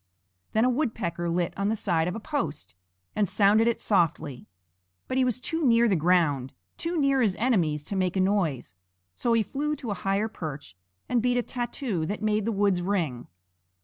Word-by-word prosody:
Then 220 +2 +3
a - - +4
woodpecker 215 - -2
lit 170 0 0
on 200 +1 0
the 220 - +1
side 175 -6 0
of 180 - -2
a - - -4
post, 165 - -4 0.4
and 205 -4 +1
sounded 215 +2 +4
it 235 - +1
softly. 165 - 0 0.6
But 255 - -2
he 260 - +4
was 250 -1 0
too 325 +5 -3
near 235 -3 +5
the 200 - +3
ground, 155 -6 +2 0.2
too 335 0 -2
near 275 -2 +3
his 205 -6 +2
enemies 175 - +1
to 200 - -5
make 185 0 0
a - - +2
noise; 185 - 0 0.4
so 235 - 0
he 230 -1 +3
flew 290 +8 -2
to 250 -6 -5
a 200 - -5
higher 195 +2 +1
perch 150 - -7 0.3
and 245 -2 +1
beat 245 +1 +1
a 245 - +1
tattoo 240 - -3
that 205 +2 -4
made 215 -1 +1
the 230 - 0
woods 200 -3 +2
ring. 170 -10 -2
205 Hz, 195 wpm, -27 LUFS, 170-235 Hz, 0.6 s, near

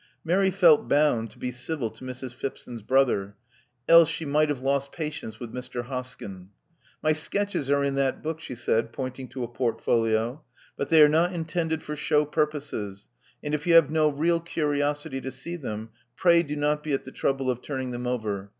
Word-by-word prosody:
Mary 190 +4 +3
felt 175 -5 +5
bound 140 -6 +3
to 105 - -19
be 125 - -3
civil 125 +1 -3
to 115 +3 -14
Mrs. 130 -1 -6
Phipson's 120 -2 -6
brother: 105 -5 +2 0.5
else 165 -1 +8
she 165 - -4
might 150 +1 +2
have 140 -3 -2
lost 140 0 0
patience 150 -9 -5
with 120 -2 -7
Mr. 125 -1 -5
Hoskyn. 120 -7 -7 0.6
My 155 - +4
sketches 155 -1 -1
are 140 0 +3
in 140 0 0
that 135 -1 0
book," 160 0 -3
she 125 - -7
said, 115 -1 0
pointing 130 0 -5
to 130 0 -5
a - - -3
portfolio. 115 +1 0 0.3
But 140 - -3
they 160 -2 +8
are - - +8
not 165 +4 +2
intended 160 -1 -2
for 150 - -5
show 150 0 +2
purposes; 145 -10 -3 0.3
and 150 - -3
if 150 +2 -2
you 170 - +5
have 165 -3 +7
no 155 -1 +3
real 165 +4 +1
curiosity 145 -4 -1
to 130 - -5
see 150 +7 -6
them, 110 -8 -6 0.2
pray 170 +1 +5
do 150 -3 -4
not 150 0 0
be 150 -1 -3
at 135 - -1
the 130 - -8
trouble 135 -1 0
of 125 0 -5
turning 130 -3 -4
them 120 0 -4
over. 105 -5 -2
140 Hz, 195 wpm, -26 LUFS, 125-155 Hz, 0.6 s, else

